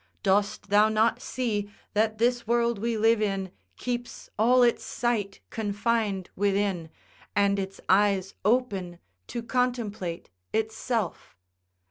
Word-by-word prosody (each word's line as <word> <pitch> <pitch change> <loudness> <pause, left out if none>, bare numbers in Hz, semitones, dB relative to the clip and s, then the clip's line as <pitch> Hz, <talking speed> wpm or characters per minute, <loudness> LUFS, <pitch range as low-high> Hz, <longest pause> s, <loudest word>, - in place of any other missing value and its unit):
Dost 200 +1 +1
thou 210 +1 +6
not 220 +3 +2
see 215 -7 -2 0.2
that 215 +1 +1
this 240 0 +1
world 235 -1 +2
we 230 +1 -1
live 225 0 +4
in 195 -3 -1 0.3
keeps 245 -1 -5
all 245 +3 +5
its 240 -1 +3
sight 220 -5 -2
confined 205 -2 -1
within, 195 -4 0 0.5
and 200 0 +3
its 195 0 -5
eyes 195 -1 +3
open 200 -6 +1 0.3
to 235 - -4
contemplate 230 -8 -2 0.2
itself? 220 - -2
215 Hz, 115 wpm, -27 LUFS, 200-235 Hz, 0.5 s, thou